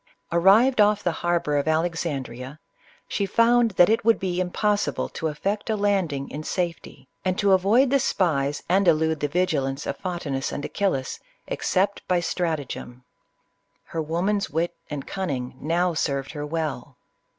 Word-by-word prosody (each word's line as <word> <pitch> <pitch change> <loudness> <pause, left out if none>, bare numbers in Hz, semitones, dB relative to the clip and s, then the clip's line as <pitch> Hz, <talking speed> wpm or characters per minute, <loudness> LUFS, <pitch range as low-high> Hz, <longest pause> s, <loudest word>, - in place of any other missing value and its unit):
Arrived 210 +8 +5
off 210 0 +3
the 175 - +1
harbor 170 -4 +1
of 145 - -1
Alexandria, 155 -5 -2 0.5
she 200 - -1
found 235 +3 +4
that 175 - +7
it 225 +1 +2
would 225 +1 +4
be 180 -1 -2
impossible 205 +3 0
to 160 - -4
effect 195 +9 -3
a 220 - +2
landing 190 -9 0
in 150 - -5
safe 175 +1 -2
ty, - - -14 0.2
and 185 0 0
to 200 -1 +3
avoid 210 +8 +4
the 275 - +4
spies 145 - 0
and 190 +2 +3
elude 160 -1 +3
the 145 - 0
vigilance 145 -5 -1
of - - -2
Photinus 165 -8 -3
and 145 - -4
Achillas, 140 -11 -1 0.3
except 195 +2 0
by 180 -1 +2
stratagem. 155 -8 -3 0.8
Her 165 - -4
woman's 180 +6 -1
wit 165 +3 -1
and 145 -2 -5
cunning 135 -11 -4
now 170 +4 +1
served 140 -3 -1
her 150 -1 -5
well. 150 -4 -4
170 Hz, 155 wpm, -24 LUFS, 145-195 Hz, 0.8 s, that